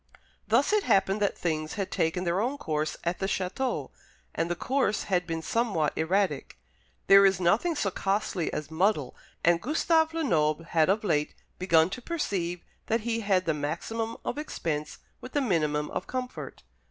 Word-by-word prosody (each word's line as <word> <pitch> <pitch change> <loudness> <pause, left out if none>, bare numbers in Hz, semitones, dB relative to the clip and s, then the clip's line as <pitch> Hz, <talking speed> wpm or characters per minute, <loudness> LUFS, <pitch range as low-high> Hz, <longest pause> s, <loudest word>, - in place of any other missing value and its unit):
Thus - - +3
it 425 - +4
happened 195 - +2
that 200 - +1
things 155 -2 -2
had 200 -3 -3
taken 165 +3 0
their 175 +2 +1
own 260 +5 -1
course 155 - -2
at 170 +1 -1
the 195 - -1
château, 195 +7 -2 0.4
and 165 - -1
the 175 - 0
course 250 0 0
had 180 -3 0
been 165 -1 -3
somewhat 200 -11 0
erratic. 190 +5 0 0.5
There 195 0 +8
is 195 -2 +4
nothing 210 - +2
so 205 -9 0
costly 195 -3 -1
as 150 0 -5
muddle, 160 -5 +1 0.3
and 170 0 +4
Gustave 320 +4 +2
Lenoble 160 - +1
had 165 0 +2
of 210 +3 +2
late 150 -7 0 0.2
begun 170 -1 +4
to 250 - -5
perceive 185 - -2 0.2
that 225 +1 +1
he 230 +1 -1
had 195 -4 +1
the 160 - +1
maximum 175 +10 -3
of - - -2
expense 155 - -3 0.2
with 255 - -9
the 290 - +2
minimum 150 - 0
of - - -4
comfort. 255 -1 -5
190 Hz, 170 wpm, -28 LUFS, 165-225 Hz, 0.5 s, There